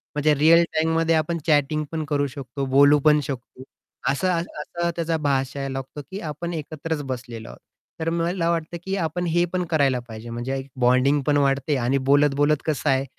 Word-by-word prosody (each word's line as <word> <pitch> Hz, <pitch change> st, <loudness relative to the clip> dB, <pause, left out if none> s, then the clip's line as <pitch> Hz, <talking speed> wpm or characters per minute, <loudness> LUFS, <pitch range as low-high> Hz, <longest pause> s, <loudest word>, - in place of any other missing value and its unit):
म्हणजे 150 Hz, +1 st, +3 dB
रिअल 165 Hz, +4 st, +6 dB
टाईममध्ये 160 Hz, +1 st, +2 dB
आपण 160 Hz, +2 st, 0 dB
चॅटिंग 150 Hz, 0 st, +2 dB
पण 160 Hz, -1 st, -2 dB
करू 145 Hz, -1 st, +1 dB
शकतो, 135 Hz, +1 st, -5 dB
बोलू 140 Hz, +2 st, +5 dB
पण 150 Hz, 0 st, +6 dB
शकतो. 130 Hz, -2 st, -7 dB, 0.5 s
असं 140 Hz, +7 st, 0 dB
असं 170 Hz, 0 st, -3 dB
त्याचा 165 Hz, -1 st, -1 dB
भासायला 135 Hz, -1 st, -1 dB
लागतो, 135 Hz, +2 st, -6 dB
की 195 Hz, -, -5 dB
आपण 170 Hz, +2 st, -5 dB
एकत्रच 155 Hz, 0 st, -4 dB
बसलेलो 120 Hz, -3 st, -6 dB
आहोत. -, -, -12 dB, 0.4 s
तर 165 Hz, -, 0 dB
मला 170 Hz, +1 st, 0 dB
वाटतं, 170 Hz, 0 st, -2 dB
की 190 Hz, +1 st, -2 dB
आपण 175 Hz, 0 st, -2 dB
हे 175 Hz, +1 st, +2 dB
पण 180 Hz, -1 st, 0 dB
करायला 140 Hz, -5 st, +2 dB
पाहिजे. 110 Hz, +1 st, -9 dB
म्हणजे 120 Hz, +3 st, -3 dB
एक 135 Hz, 0 st, -6 dB
बॉन्डिंग 130 Hz, +4 st, +3 dB
पण 145 Hz, 0 st, +3 dB
वाढते 140 Hz, +1 st, +1 dB
आणि 130 Hz, +3 st, +1 dB
बोलत-बोलत 145 Hz, +1 st, +4 dB
कसं 155 Hz, -4 st, 0 dB
आहे 135 Hz, 0 st, +2 dB
150 Hz, 175 wpm, -23 LUFS, 135-165 Hz, 0.5 s, रिअल